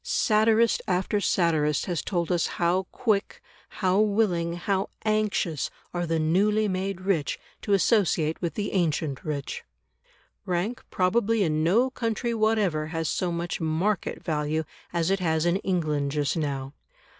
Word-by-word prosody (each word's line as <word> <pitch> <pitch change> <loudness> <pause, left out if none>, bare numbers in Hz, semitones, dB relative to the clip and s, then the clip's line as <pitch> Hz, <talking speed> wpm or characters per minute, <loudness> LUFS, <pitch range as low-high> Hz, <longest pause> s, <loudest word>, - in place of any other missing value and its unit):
Satirist 220 +1 +3
after 190 +3 0
satirist 155 -6 +1
has 175 -4 -2
told 175 -2 -2
us 175 -2 +2
how 180 +2 +1
quick, 215 -4 0 0.3
how 190 0 +1
willing, 200 -6 +2
how 190 +3 -1 0.2
anxious 215 -8 0 0.2
are 175 -1 -2
the 165 0 +1
newly 205 +7 +2
made 190 0 -2
rich 185 -6 0 0.2
to 205 - 0
associate 180 -6 +2
with 170 -2 -2
the 205 -1 -3
ancient 155 -6 0
rich. 145 -3 -4 0.8
Rank 185 +7 -2
probably 210 +3 +2
in 155 -2 +1
no 230 +10 +3
country 235 -1 -2
whatever 215 -9 +1
has 165 0 -2
so 180 -2 -1
much 170 0 -3
"market" 170 +5 -1
value 155 0 -1 0.3
as 170 +1 0
it 195 - +2
has 160 -2 +1
in 175 +2 +3
England 155 -7 -1
just 145 +1 0
now. 140 -4 -3
180 Hz, 145 wpm, -26 LUFS, 160-205 Hz, 0.8 s, Satirist